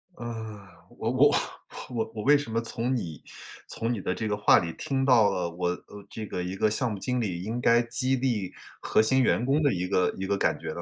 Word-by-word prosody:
呃， 110 Hz, -4 st, -7 dB, 0.3 s
我 -, -, -1 dB
我 -, -, +5 dB
我 -, -, +1 dB, 0.5 s
我 115 Hz, -2 st, -3 dB
我 105 Hz, -, -4 dB
为 145 Hz, +5 st, +6 dB
什 140 Hz, -6 st, -6 dB
么 115 Hz, -, +1 dB
从 115 Hz, +2 st, -2 dB
你 80 Hz, -, -5 dB, 0.5 s
从 115 Hz, +1 st, -3 dB
你 105 Hz, -, -4 dB
的 90 Hz, -, -2 dB
这 110 Hz, -, -3 dB
个 105 Hz, -, 0 dB
话 105 Hz, -, +6 dB
里 85 Hz, -1 st, -4 dB
听 135 Hz, -3 st, -1 dB
到 120 Hz, -6 st, +5 dB
了 90 Hz, -3 st, -2 dB
我 90 Hz, +1 st, -2 dB
呃， 100 Hz, +3 st, -7 dB
这 110 Hz, -, -6 dB
个 90 Hz, -3 st, -4 dB
一 90 Hz, +1 st, -4 dB
个 105 Hz, +2 st, +2 dB
项 120 Hz, +2 st, 0 dB
目 105 Hz, -, -4 dB
经 125 Hz, +4 st, -1 dB
理 90 Hz, -5 st, -3 dB
应 115 Hz, +4 st, -3 dB
该 120 Hz, 0 st, +5 dB
激 130 Hz, +3 st, 0 dB
励 120 Hz, -8 st, -1 dB, 0.3 s
核 -, -, +3 dB
心 130 Hz, +5 st, +3 dB
员 120 Hz, -1 st, +2 dB
工 140 Hz, +4 st, +2 dB
的 145 Hz, -3 st, +3 dB
一 90 Hz, 0 st, -2 dB
个 90 Hz, -2 st, +2 dB
一 95 Hz, -, -3 dB
个 100 Hz, +1 st, 0 dB
感 -, -, +1 dB
觉 -, -, -6 dB
呢？ -, -, -6 dB
110 Hz, 260 characters per minute, -27 LUFS, 95-125 Hz, 0.5 s, 为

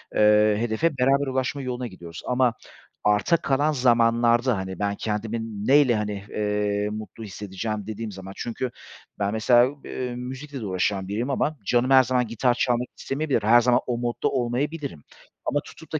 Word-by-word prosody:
eee, 105 Hz, 0 st, +5 dB
hedefe 120 Hz, +7 st, 0 dB
beraber 135 Hz, +2 st, +3 dB
ulaşma 130 Hz, +2 st, -1 dB
yoluna 125 Hz, -1 st, -3 dB
gidiyoruz. 85 Hz, -4 st, -10 dB
Ama 125 Hz, -1 st, +2 dB, 0.5 s
arta 105 Hz, -, +3 dB
kalan 145 Hz, 0 st, +1 dB
zamanlarda, 120 Hz, -2 st, +3 dB
hani, 95 Hz, -1 st, -5 dB
"Ben 100 Hz, 0 st, 0 dB
kendimin 110 Hz, 0 st, -4 dB
ne 140 Hz, -, +7 dB
ile, 125 Hz, -5 st, +3 dB
hani, 105 Hz, -2 st, -3 dB
eee, 105 Hz, 0 st, -1 dB
mutlu 110 Hz, +1 st, -7 dB
hissedeceğim?" 105 Hz, +1 st, -5 dB
dediğim 110 Hz, 0 st, -5 dB
zaman 95 Hz, 0 st, -9 dB
Çünkü 120 Hz, +2 st, -3 dB, 0.5 s
ben 100 Hz, 0 st, 0 dB
mesela 120 Hz, +2 st, +5 dB
u 140 Hz, 0 st, -14 dB
b -, -, -10 dB
eee, 125 Hz, -1 st, -4 dB
müzikle 130 Hz, +2 st, -7 dB
de -, -, -4 dB
uğraşan 95 Hz, 0 st, -1 dB
biriyim 110 Hz, +7 st, -2 dB
ama 150 Hz, +2 st, 0 dB
canım 120 Hz, +5 st, +2 dB
her 130 Hz, -1 st, +8 dB
zaman 125 Hz, -1 st, 0 dB
gitar 120 Hz, +3 st, +1 dB
çalmak 125 Hz, 0 st, 0 dB
istemeyebilir. 140 Hz, -5 st, -1 dB
Her 120 Hz, +3 st, +6 dB
zaman 120 Hz, +1 st, +3 dB
o 120 Hz, -1 st, -1 dB
modda 120 Hz, 0 st, -1 dB
olmayabilirim 135 Hz, -, -2 dB, 0.4 s
ama 145 Hz, -, +1 dB
tutup 160 Hz, -, -14 dB
da 155 Hz, -, 0 dB
120 Hz, 175 wpm, -25 LUFS, 105-130 Hz, 0.5 s, her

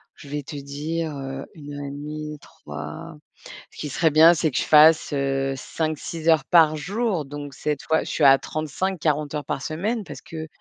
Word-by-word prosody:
je 140 Hz, -, -13 dB
vais 145 Hz, 0 st, -3 dB
te 145 Hz, -, -9 dB
dire, 150 Hz, +4 st, -4 dB
heu, 135 Hz, 0 st, -5 dB
1 145 Hz, -2 st, -9 dB
heure 145 Hz, 0 st, -6 dB
et -, -, -6 dB
1/2 150 Hz, +1 st, -6 dB
3. -, -, -9 dB, 0.6 s
Ce -, -, -18 dB
qui 150 Hz, -, -5 dB
serait 160 Hz, +4 st, +2 dB
bien, 160 Hz, +3 st, +8 dB
c'est 160 Hz, -1 st, +1 dB
que -, -, -2 dB
je -, -, +2 dB
fasse, 155 Hz, 0 st, +6 dB
heu, 135 Hz, -1 st, 0 dB
5-6 155 Hz, +3 st, -4 dB
heures 160 Hz, -4 st, +4 dB
par 160 Hz, -3 st, +5 dB
jour, 195 Hz, 0 st, -1 dB
donc 145 Hz, 0 st, -8 dB
cette 150 Hz, +2 st, -3 dB
fois, 160 Hz, -, +1 dB
je -, -, -7 dB
suis 155 Hz, -, -1 dB
à 135 Hz, 0 st, +8 dB
35-40 155 Hz, -1 st, -2 dB
heures 150 Hz, -2 st, -3 dB
par -, -, -3 dB
semaine 205 Hz, -, -2 dB
parce -, -, -10 dB
que 160 Hz, -1 st, -7 dB
150 Hz, 200 wpm, -23 LUFS, 145-160 Hz, 0.6 s, bien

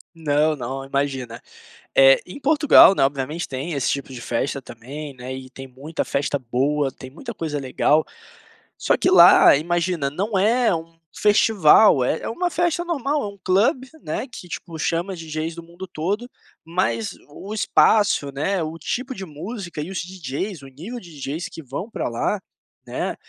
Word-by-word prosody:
Não, 155 Hz, -1 st, +1 dB
não, 135 Hz, 0 st, -5 dB
imagina, 135 Hz, -4 st, -3 dB, 0.6 s
eh, 135 Hz, 0 st, +7 dB
em 180 Hz, -, -10 dB
Portugal, 290 Hz, -8 st, +6 dB
né, -, -, 0 dB
obviamente 140 Hz, +5 st, -2 dB
tem 135 Hz, +6 st, -4 dB
esse 140 Hz, -3 st, 0 dB
tipo 140 Hz, -1 st, -3 dB
de 125 Hz, -, -8 dB
festa 130 Hz, +4 st, -2 dB
também, 140 Hz, +6 st, -8 dB
né, 125 Hz, +1 st, -7 dB
e 130 Hz, 0 st, -9 dB
tem 135 Hz, 0 st, -10 dB
muita 140 Hz, +6 st, -5 dB
festa 145 Hz, +1 st, -1 dB
boa, 135 Hz, +3 st, 0 dB
tem 130 Hz, -, -11 dB
muita 235 Hz, -, -8 dB
coisa 155 Hz, -5 st, -3 dB
legal, 145 Hz, +3 st, +2 dB, 0.7 s
só -, -, +2 dB
que -, -, +1 dB
lá -, -, +8 dB
imagina 170 Hz, -2 st, -1 dB
não 200 Hz, +6 st, -2 dB
é 225 Hz, +3 st, +3 dB
um 165 Hz, 0 st, -8 dB, 0.2 s
festival, 210 Hz, -, +5 dB
é 155 Hz, -, 0 dB
é -, -, -4 dB
uma 355 Hz, +10 st, -1 dB
festa 345 Hz, 0 st, 0 dB
normal, 295 Hz, -3 st, -1 dB
é -, -, -3 dB
um 200 Hz, -, -9 dB
club, 240 Hz, -, +2 dB, 0.2 s
né, 270 Hz, -, -3 dB
que 205 Hz, -7 st, -11 dB
tipo, 170 Hz, -1 st, -7 dB
chama 170 Hz, +4 st, -1 dB
DJs 160 Hz, 0 st, -5 dB
do 170 Hz, -, -9 dB
mundo 175 Hz, +3 st, -10 dB
todo, 195 Hz, +8 st, -3 dB, 0.3 s
mas 115 Hz, -, -2 dB
o 195 Hz, +8 st, -8 dB
espaço, 205 Hz, -8 st, +3 dB
né, 175 Hz, +7 st, -1 dB
o 160 Hz, +1 st, -4 dB
tipo 255 Hz, -, -4 dB
de 190 Hz, -, -6 dB
música 175 Hz, +1 st, -7 dB
e 155 Hz, -, -6 dB
os 190 Hz, -, -4 dB
DJs, 180 Hz, 0 st, -5 dB
o 135 Hz, -, -11 dB
nível 170 Hz, -, -8 dB
de 180 Hz, -, -14 dB
DJs 150 Hz, +3 st, -5 dB
que 165 Hz, -, -9 dB
vão 140 Hz, -, -6 dB
pra -, -, -3 dB
lá 120 Hz, -, -1 dB, 0.5 s
,né, -, -, -3 dB
160 Hz, 175 wpm, -22 LUFS, 140-195 Hz, 0.7 s, lá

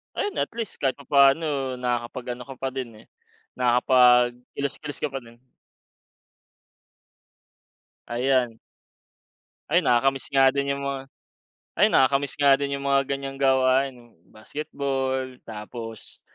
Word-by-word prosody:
Ayun, 410 Hz, -, -2 dB
at -, -, -8 dB
least 230 Hz, -3 st, -5 dB
kahit 135 Hz, 0 st, -1 dB
papaano 140 Hz, -1 st, +2 dB
nakakapag-ano 125 Hz, 0 st, -3 dB
ka 135 Hz, +1 st, -10 dB
pa 135 Hz, -, -2 dB
din, 130 Hz, -2 st, -4 dB
eh, -, -, -18 dB, 0.5 s
nakapag-kilos-kilos 125 Hz, +3 st, +2 dB
ka -, -, -1 dB
pa 135 Hz, -2 st, -6 dB
din. 115 Hz, 0 st, -17 dB, 2.7 s
Ayan. 125 Hz, -1 st, 0 dB, 1.1 s
Ay, -, -, +3 dB
nakakamiss 135 Hz, +2 st, +2 dB
nga 135 Hz, -1 st, +6 dB
din 140 Hz, +1 st, -1 dB
yung 140 Hz, 0 st, -5 dB
mga 135 Hz, -1 st, -3 dB, 0.7 s
ay -, -, +4 dB
nakakamiss 140 Hz, +1 st, +2 dB
nga 140 Hz, -1 st, +5 dB
din 140 Hz, 0 st, -2 dB
yung 140 Hz, -, -7 dB
mga 140 Hz, 0 st, +3 dB
ganyang 135 Hz, 0 st, -4 dB
gawain, 130 Hz, 0 st, +3 dB
eh, 120 Hz, -1 st, -19 dB, 0.2 s
basketball, 130 Hz, 0 st, -4 dB
tapos 110 Hz, +1 st, -8 dB
135 Hz, 115 wpm, -25 LUFS, 125-140 Hz, 2.7 s, nga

